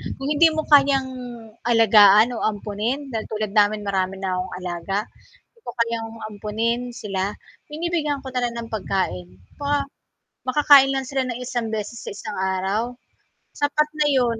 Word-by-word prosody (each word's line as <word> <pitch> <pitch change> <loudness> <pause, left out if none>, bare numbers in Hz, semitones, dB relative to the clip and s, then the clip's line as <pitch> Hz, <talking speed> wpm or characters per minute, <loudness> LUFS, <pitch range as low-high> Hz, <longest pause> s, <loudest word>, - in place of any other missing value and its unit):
kung 270 - -6
hindi 325 +3 +6
mo 315 - +1
kayang 275 -2 +5 0.6
alagaan 215 -1 +7
o - - -4
ampunin 210 +6 -3
dahil 220 -1 -3
tulad 215 -2 -2
namin 210 +1 +2
marami 190 -1 0
na 190 -1 -3
akong 180 0 -4
alaga, 180 +2 -3 0.6
di - - -25
ko - - -5
kayang 230 -1 0 0.2
ampunin 220 +3 -2 0.2
sila, 195 -2 -2 0.5
binibigyan 305 -3 -2
ko - - -8
na 250 -1 -2
lang 240 -1 -1
ng 230 -1 -6
pagkain 140 - -2 0.3
pa 285 0 -3 0.8
makakain 275 0 +6
lang 270 -1 -2
sila 270 -1 0
ng 240 -1 -3
isang 240 -2 -2
beses 215 +2 -4
sa - - -4
isang 285 +8 -7 0.2
araw 195 +4 0 0.8
sapat 300 +1 +2
na 300 - +3
yun 235 -3 +1
230 Hz, 160 wpm, -22 LUFS, 205-270 Hz, 0.8 s, alagaan